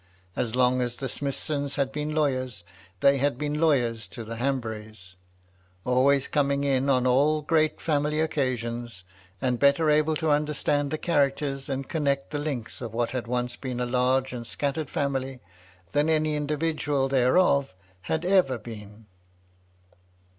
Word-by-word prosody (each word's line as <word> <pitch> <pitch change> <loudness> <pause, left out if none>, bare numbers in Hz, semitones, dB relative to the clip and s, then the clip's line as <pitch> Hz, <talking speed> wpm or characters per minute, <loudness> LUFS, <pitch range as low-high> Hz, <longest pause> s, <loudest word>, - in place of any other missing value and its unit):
As 115 -1 -1
long 125 0 +3
as 120 -1 -2
the 135 - -4
Smithsons 140 +1 -3
had 135 -1 0
been 150 +1 -3
lawyers, 130 - -1 0.4
they 140 0 +5
had 140 -2 +1
been 150 +2 -2
lawyers 120 -8 +2
to 115 - -8
the 115 +1 -7
Hanburys; 110 -7 -4 0.7
always 130 +2 +3
coming 140 -1 +1
in 135 -1 +1
on 130 -2 +3
all 145 +4 +3
great 155 0 +2
£sunily 150 0 0
occasions, 120 - -2 0.4
and 125 -2 +1
better 145 +2 +4
able 155 +1 +3
to 155 0 0
understand 145 -1 +1
the 155 - -2
characters, 140 -3 0
and 135 0 -3
connect 140 -3 -1
the 145 - -2
links 140 -7 -4
of 115 -2 -6
what 120 0 0
had 125 -3 -3
once 125 0 -2
been 125 -2 -5
a 125 - 0
large 130 +1 +1
and 120 -2 -6
scattered 145 +3 -2
family, 135 -2 -2 0.5
than 145 +2 +2
any 155 -1 +2
individual 150 -2 0
thereof 135 - +3 0.3
had 160 - -2
ever 180 -9 +3
been. 105 -1 -11
135 Hz, 150 wpm, -26 LUFS, 125-150 Hz, 0.7 s, they